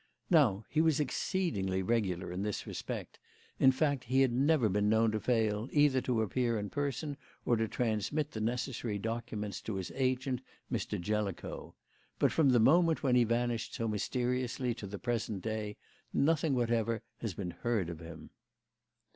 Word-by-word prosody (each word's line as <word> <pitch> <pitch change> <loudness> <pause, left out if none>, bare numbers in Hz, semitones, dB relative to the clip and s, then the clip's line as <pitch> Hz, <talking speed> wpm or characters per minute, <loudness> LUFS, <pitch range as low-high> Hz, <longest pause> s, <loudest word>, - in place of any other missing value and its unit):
Now, 115 - +4
he 155 - +2
was 160 -3 +3
exceedingly 115 - -1
regular 95 -5 0
in 90 +2 -3
this 105 0 -2
respect; - - -6 0.4
in 130 - +7
fact, 140 -1 0
he 130 +3 +3
had 130 -2 +4
never 135 -1 +3
been 105 +1 +1
known 110 0 +4
to 110 - -1
fail, 110 0 +1
either 145 -3 +4
to 120 -3 +1
appear 115 +2 0
in 105 -1 -4
person 145 +1 -2 0.3
or 120 - +3
to 110 0 0
transmit 125 +7 -1
the 110 - -5
necessary 120 -1 -2
documents 110 -2 -4
to 110 - -4
his 95 -2 -4
agent, 130 -1 0 0.3
Mr. - - -2
Jellicoe. 105 0 -3 0.4
But - - +3
from 155 -4 +4
the 125 -2 +5
moment 165 +7 +4
when 130 -3 +3
he 120 -1 +5
vanished 120 0 -1
so 115 - -1
mysteriously 125 +3 -1
to 105 -3 -7
the 100 +1 -6
present 115 -4 -2
day, 110 -2 -3 0.3
nothing 155 -1 +2
whatever 115 -1 0 0.2
has 110 -6 -4
been 90 -3 -4
heard 105 +1 -1
of 80 - -8
him." 80 -2 -10
115 Hz, 165 wpm, -32 LUFS, 105-130 Hz, 0.4 s, in